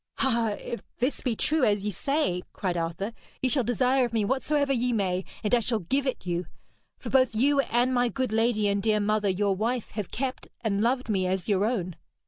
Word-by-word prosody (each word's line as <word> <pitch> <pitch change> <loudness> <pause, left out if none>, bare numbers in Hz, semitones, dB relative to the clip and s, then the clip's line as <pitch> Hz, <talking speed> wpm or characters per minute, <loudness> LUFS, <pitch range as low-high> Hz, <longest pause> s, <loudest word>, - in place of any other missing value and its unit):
'Ah, 230 -5 +2
if 235 - -5 0.2
this 255 +4 -1
be 245 -4 -1
true 310 +5 +1
as 205 -3 +2
ye 210 - 0
say,' 275 - 0
cried 185 -3 -2
Arthur, 170 +6 -3 0.3
'ye 260 - +1
shall 260 0 +2
desire 250 +3 +2
of 240 -2 -2
me 220 -3 +1
whatsoever 275 +3 +1
ye 250 0 +1
may, 190 -4 0 0.2
and 210 - -1
I 245 - +6
shall 230 0 0
give 265 +9 -1
it 260 - -3
you. 175 -1 -2 0.5
For - - -7
both 260 -4 +3
you 280 +5 +3
and 250 -1 +2
my 245 -1 +2
good 260 -2 -2
lady 225 -1 +2
and 200 0 +1
dear 215 0 +2
mother 210 0 +1
your 195 +1 +1
wife 230 +4 -2
have 210 -4 -4
kept 260 +1 -4
and 205 -3 0
loved 250 +3 +1
me 190 -4 +1
as 185 -1 -1
your 200 -1 +2
own.' 185 -7 -2
225 Hz, 215 wpm, -27 LUFS, 200-255 Hz, 0.5 s, I